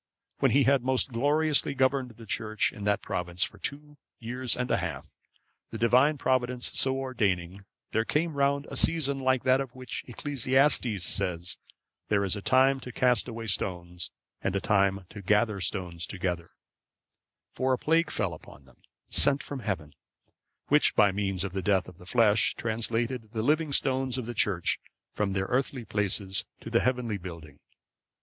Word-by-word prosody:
When - - +3
he 140 +1 +4
had 135 -1 +3
most 130 +1 +2
gloriously 145 +3 +2
governed 130 -1 +1
the 115 - -11
church 110 0 -1
in 100 - -8
that 105 0 +1
province 90 0 -2
for - - -5
two 145 +1 -6 0.2
years 125 +2 -2
and 125 0 -2
a - - +3
half, - - -5 0.6
the 110 - -6
Divine 130 +6 +4
Providence 125 -2 0
so 130 0 +2
ordaining, 100 -8 -2 0.3
there 110 - +1
came 160 +7 -1
round 140 0 +1
a - - -5
season 145 -4 +3
like 130 -1 +1
that 130 +1 +3
of 130 -2 -7
which 130 -2 -6
Ecclesiastes 130 - +1
says, 90 -3 0
"That - - -24 0.3
there 100 -1 +2
is 95 0 +1
a 100 - -5
time 135 +4 +3
to 125 - -8
cast 125 -2 +2
away 115 -1 -6
stones, 90 -4 -3 0.3
and 100 - -1
a - - +2
time 100 -2 +1
to 105 - -9
gather 105 +1 +1
stones 90 -3 -2
together;"(548) 90 -3 -3 1.0
for 130 0 0
a - - +1
plague 165 +4 +2
fell - - -1
upon 70 - -13
them, 65 - -22 0.3
sent 140 0 +4
from 140 - -6
Heaven, 80 - -4 0.8
which, 150 +1 +4
by 100 -2 +5
means 95 -1 -2
of 100 -2 -4
the 95 - -2
death 95 0 +1
of 90 -1 -13
the 90 - -14
flesh, 110 -1 +3
translated 115 +1 -2
the 110 -1 -2
living 150 +3 +1
stones 130 -2 +1
of 125 - -3
the 120 - -5
Church 100 -5 +1 0.3
from 100 -2 -1
their 95 0 -1
earthly 125 +1 -1
places 100 -2 +1
to 115 - -8
the 115 - +4
heavenly 125 -5 -1
building. 85 -5 -10
115 Hz, 175 wpm, -28 LUFS, 100-130 Hz, 1.0 s, by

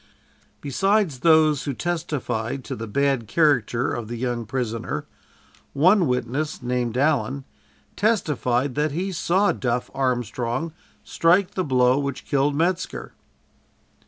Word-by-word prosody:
Besides 195 +1 +1
those 155 -2 +4
who 140 -3 -2
testified 135 -8 -3
to - - -5
the 115 +1 -6
bad 135 0 0
character 125 -3 +2
of 115 -2 -4
the 120 +1 -5
young 120 -2 -3
prisoner, 115 - -3 0.7
one 180 +5 +4
witness, 130 +4 -2
named 125 -1 -1
Allen, 135 -2 +1 0.5
testified 145 - +1
that 150 +1 0
he 185 +5 -2
saw 185 +3 +2
"Duff" 120 -1 -2
Armstrong 125 +3 -2 0.3
strike 180 +3 +2
the 185 - -2
blow 130 -2 +3
which 140 -1 -4
killed 140 +1 +1
Metzker. 175 +4 -1
140 Hz, 120 wpm, -23 LUFS, 120-160 Hz, 0.7 s, those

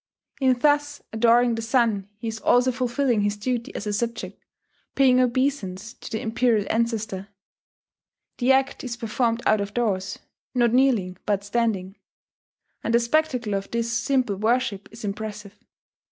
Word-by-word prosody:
In 260 -2 +3
thus 290 +1 +1
adoring 235 +2 +4
the 225 - -3
sun 225 -4 +1
he 230 +2 -6
is 220 0 -4
also 250 +3 +3
fulfilling 250 -2 0
his 205 0 0
duty 235 +2 -2
as - - -4
a 210 - -2
subject, 230 +2 -3 0.5
paying 255 -2 +5
obeisance 235 -6 0
to - - -10
the 220 - -3
Imperial 225 -2 +1
Ancestor.... 220 -4 -1 1.1
The 250 +1 +3
act 270 +1 +1
is 245 -2 -4
performed 230 +1 -1
out 215 -1 +3
of 200 +1 -5
doors, 195 -5 -1 0.4
not 240 -2 +3
kneeling, 235 -9 +2
but 200 -1 +1
standing; 205 -3 -1 0.9
and 230 - +1
the - - +6
spectacle 240 -3 0
of 195 0 -3
this 235 0 -1
simple 240 -3 +1
worship 220 -1 0
is 220 0 -9
impressive. 205 0 -5
230 Hz, 150 wpm, -24 LUFS, 210-250 Hz, 1.1 s, the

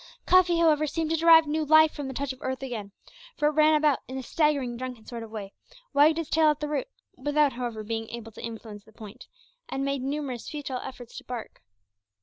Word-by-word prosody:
Cuffy, 360 -2 +5
however, 310 -2 +3
seemed 320 +2 -2
to - - +3
derive 325 0 +7
new 310 +1 -1
life 315 +1 +6
from 290 -3 -5
the 265 - -5
touch 280 0 -2
of 260 - -18
earth 260 +1 -3
again, 220 -6 -5 0.5
for 295 - +3
it - - -2
ran 310 +1 +4
about 300 -2 +3
in 260 - -6
a 265 - -5
staggering 280 -4 0
drunken 250 -2 -7
sort 235 -2 -7
of 225 - -8
way; 205 -3 -7 0.4
wagged 305 +3 +5
its 330 -2 -4
tail 320 -1 +4
at 300 -1 +2
the 300 - -3
root, 300 +12 -2 0.3
without, 290 +1 +2
however, 240 -3 -4
being 225 +1 -4
able 230 -1 -8
to - - -11
influence 220 -2 -8
the 220 - -21
point, 220 +2 -12 0.4
and 270 0 -2
made 275 -1 -1
numerous 270 -3 -4
futile 280 -4 -4
efforts 245 -2 -9
to - - -17
bark. 245 -3 -8
275 Hz, 220 wpm, -27 LUFS, 235-305 Hz, 0.5 s, derive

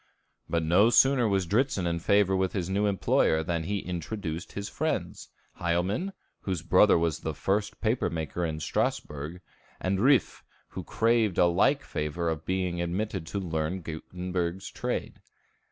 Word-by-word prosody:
But 85 -1 0
no 90 +8 +5
sooner 130 -1 +5
was 95 -3 +1
Dritzhn 105 0 +1
in 85 0 0
favor 100 +1 +3
with 95 0 0
his 95 -2 -2
new 100 +2 +2
employer 85 -4 +2
than 85 -1 -2
he 100 +3 -1
introduced 85 -1 -5
his 100 0 -4
friends - - -3 0.3
Hielman, 90 - 0 0.3
whose 90 -5 -3
brother 90 +4 +5
was 80 -2 0
the 80 -2 -4
first 100 +8 -1
paper 115 +2 +1
maker 80 +1 -3
in 80 -2 -2
Strasbourg, 75 +3 -2 0.4
and 95 +1 0
Riffe, 135 +4 +3 0.3
who - - -6
craved 115 -4 +1
a - - +6
like 125 +12 +3
favor 75 +3 -2
of 80 -2 -5
being 90 -2 -1
admitted 90 0 -2
to 100 - -3
learn 85 0 -2
Gutenberg's 90 +3 -4
trade. - - -4
90 Hz, 155 wpm, -28 LUFS, 85-100 Hz, 0.4 s, a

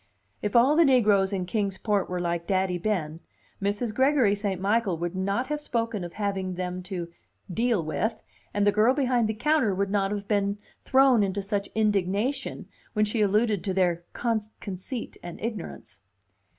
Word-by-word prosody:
If 210 +1 -2
all 255 +5 +6
the 335 - +6
negroes 210 -8 +4
in 190 -2 -2
Kings 195 0 -1
Port 205 -2 0
were 180 0 -2
like 170 -1 -2
Daddy 185 -2 +1
Ben, 170 -5 -2 0.4
Mrs. 205 +3 -1
Gregory 260 -4 +3
St. 200 -3 -2
Michael 200 -2 +1
would 175 +2 -3
not 195 +6 0
have 300 +2 -3
spoken 230 -7 -2
of 175 -1 -7
having 195 -3 -2
them 180 0 -3
"to 175 -3 -4 0.4
deal 230 -3 +1
with," 220 +8 -1 0.3
and 205 0 +1
the 205 - +5
girl 220 +5 +3
behind 250 -5 +2
the 220 - -1
counter 250 -4 +2
would 195 +1 -1
not 195 -1 +1
have 205 -1 -4
been 200 -1 +1 0.3
thrown 265 -3 +5
into 200 0 -1
such 200 0 -2
indignation 210 +5 0 0.3
when 215 -1 +3
she 215 +1 -1
alluded 210 -1 +2
to 190 -1 -2
their 175 -3 +2 0.6
conceit 200 +5 -6
and 175 -1 -8
ignorance. 185 - -6
205 Hz, 170 wpm, -26 LUFS, 185-230 Hz, 0.6 s, all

